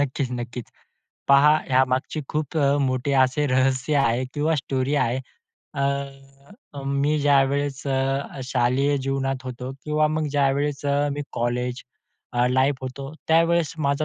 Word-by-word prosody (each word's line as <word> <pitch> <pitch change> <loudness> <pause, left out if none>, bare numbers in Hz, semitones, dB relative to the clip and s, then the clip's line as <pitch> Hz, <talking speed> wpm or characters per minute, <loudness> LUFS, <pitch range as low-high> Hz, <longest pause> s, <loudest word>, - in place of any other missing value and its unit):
नक्कीच-नक्कीच 125 -3 -3 0.6
पहा, 140 +2 +7 0.2
यामागची 130 +3 +1
खूप 155 0 -3
अ, 140 -1 +3
मोठे 130 0 0
असे 130 +3 +1
रहस्य 130 +2 +1
आहे 130 -2 +2
किंवा 155 +2 +1
स्टोरी 135 0 -1
आहे. 125 -2 +1 0.6
अ, 140 - -5
मी 140 +2 +1
ज्यावेळेस 140 -1 +2
अ, 135 0 -1
शालेय 130 +3 +1
जीवनात 135 -1 -2
होतो 125 0 -6
किंवा 150 0 +2
मग 155 0 -1
ज्यावेळेस 140 0 0
अ, 145 +1 +1
मी 145 +1 -3
कॉलेज 125 +1 -2 0.7
लाईफ 130 +2 +3
मध्ये - - -3 0.2
होतो. 135 - -8 0.2
त्यावेळेस 165 0 +3
माझा 140 0 0
140 Hz, 130 wpm, -23 LUFS, 130-145 Hz, 0.7 s, पहा